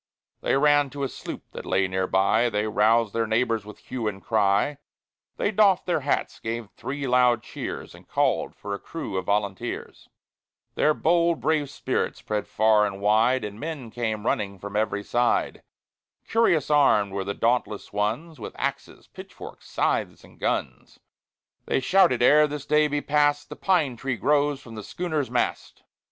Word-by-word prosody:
III - - -2
They - - +4
ran 145 0 +4
to 140 +2 -5
a - - +1
sloop - - -8
that - - -8
lay 95 0 +1
near 95 0 -1
by; 105 +6 +2
They 105 -1 -1
roused 110 +1 +2
their 115 -1 0
neighbors, 115 -1 0
with 105 - -10
hue 120 -4 -5
and 100 -2 -3
cry; 105 +6 +1 0.6
They 205 - 0
doffed 200 -3 +3
their 175 -3 +1
hats, 140 0 -2
gave 115 -1 -5
three 140 +1 -5
loud 125 -2 +3
cheers, - - -6
And - - -16
called - - 0
for 100 - -6
a 100 - -4
crew 165 -11 -6
of 95 -1 -3
volunteers. 100 -1 -3 0.6
Their 155 - +2
bold, 170 0 +2
brave 155 -3 0
spirit - - -2
spread 105 -1 -3
far 110 -1 +3
and 100 -1 -6
wide, 110 +5 +3
And 105 +1 -8
men 145 -6 -6
came 110 -3 -3
running 100 -3 -1
from 100 +2 -8
every 105 -1 0
side. 120 +3 0 0.7
Curious 170 - +2
armed 105 -9 +4
were 100 0 -2
the 100 +1 -4
dauntless 115 -4 -1
ones, 115 +11 -2
With - - -8
axes, - - -4
pitchforks, - - -12
scythes, - - -1
and - - -18
guns; - - -3 0.7
They - - +1
shouted, 170 -4 +3
"Ere 150 +4 +7
yet 150 - +3
this 145 -1 -6
day 150 +1 +3
be 145 0 -1
passed, 145 0 +1
The 150 - -7
pine 155 -11 +1
tree 135 0 -3
grows 145 0 +1
from 115 - -12
the 110 - -6
schooner's 155 - -3
mast!" - - -2
120 Hz, 175 wpm, -25 LUFS, 105-145 Hz, 0.7 s, Ere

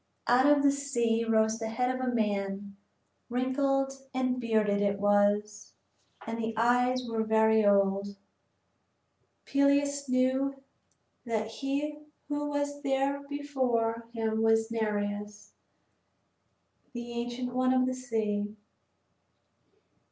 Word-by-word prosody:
Out 250 +3 +4
of 290 -1 +5
the 280 - +5
sea 240 -5 0
rose 220 0 +2
the 225 -1 -3
head 250 +3 0
of 255 - -4
a 255 -1 0
man; 200 -3 -2 0.5
wrinkled 270 +2 0 0.2
and 255 -1 0
bearded 215 -3 +1
it 200 -1 0
was, 205 +1 +1 0.5
and 230 +1 -4
the 225 -1 -3
eyes 245 +2 +2
were 225 -1 -1
very 220 0 +3
old. 200 0 +2 1.3
Peleus 280 0 +1
knew 260 +2 +1 0.6
that 225 -3 -1
he 280 +6 -3 0.3
who 290 0 -2
was 285 0 -2
there 275 +1 0
before 250 -6 -1
him 220 -1 -1
was 225 0 +2
Nereus, 210 -2 -3 1.4
the 240 0 -6
ancient 240 +1 -4
one 255 0 +2
of 255 0 +3
the 255 - -1
sea. 215 -4 -2
235 Hz, 115 wpm, -29 LUFS, 220-265 Hz, 1.4 s, of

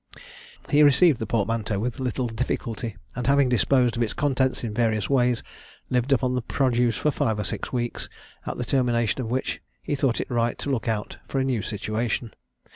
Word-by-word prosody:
He 145 - +5
received 145 0 +6
the 110 - -3
portmanteau 110 -1 0
with 120 +6 -2
little 130 0 -1
difficulty, 115 -2 -3 0.2
and 125 0 -3
having 140 -1 +4
disposed 125 +1 +3
of 120 - -2
its 115 - 0
contents 130 -3 0
in 110 -3 -3
various 110 0 0
ways, 125 -3 +2 0.5
lived 125 +2 +1
upon 130 -1 +2
the 125 - 0
produce 120 -1 +1
for 150 - +1
five 110 -5 0
or 105 - -1
six - - -4
weeks, 120 -2 -3 0.4
at - - -3
the 125 - -2
termination 120 -2 +1
of 115 - -4
which 130 +2 -2 0.2
he - - -2
thought 135 -4 +1
it - - -4
right 120 -1 +1
to 140 - -3
look 125 -2 -1
out 110 -2 -2
for - - -3
a - - +2
new 125 -5 0
situation. 110 +2 -2
120 Hz, 195 wpm, -25 LUFS, 115-130 Hz, 0.5 s, received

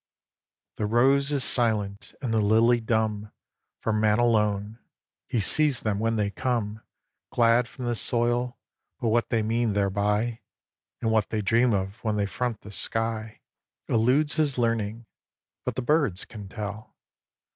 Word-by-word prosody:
xvii. - - -51
The - - +1
rose 135 +5 +3
is 140 -3 +2
silent, 105 -5 +1
and 115 -3 -1
the 110 - +2
lily 115 +3 +4
dumb 110 -2 -1 0.5
For 115 - -2
Man 105 0 +2
alone. 105 -2 +1 0.5
He 120 - -1
sees 140 +4 +3
them 105 -2 -1
when 115 +1 0
they 105 -2 0
come 110 -2 -2 0.5
Glad 120 0 +3
from 125 0 -8
the 120 - 0
soil; 120 +2 0 0.4
but 115 - 0
what 115 +1 +1
they 115 -2 +1
mean 115 0 0
thereby, 105 +3 0 0.6
And 115 - +1
what 110 -2 +1
they 110 -1 -2
dream 120 +4 +3
of, 100 +2 -3
when 110 -2 0
they 105 -1 0
front 115 +2 -3
the 105 - -11
sky, 110 +1 -3 0.5
Eludes 130 +7 +2
his 150 -4 +1
learning. 115 -1 -1 0.6
But - - -2
the 130 - -3
birds 135 - +1
can 105 -4 -10
tell. 105 0 -7
115 Hz, 155 wpm, -26 LUFS, 105-120 Hz, 0.6 s, lily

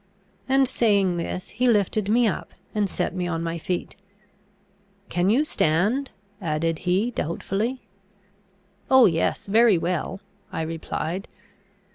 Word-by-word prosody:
and, 270 0 +4
saying 200 -7 +2
this, 175 +2 -4
he 250 +4 0
lifted 210 -2 +2
me 235 +2 +4
up, 205 - -4 0.2
and 210 -2 0
set - - -2
me 180 -1 -2
on 165 -1 -2
my 165 0 -3
feet. 180 +2 -3 1.1
"Can 180 +2 +1
you 250 +8 +4
stand?" 220 - +1 0.3
added 165 -1 -1
he, 200 +7 +2
doubtfully. 215 - -2 1.1
"Oh, 260 -2 +7
yes, 165 -5 +1
very 220 -1 +5
well," 175 +3 -2 0.3
I 160 - -2
replied. 165 +3 -4
195 Hz, 125 wpm, -24 LUFS, 170-230 Hz, 1.1 s, Oh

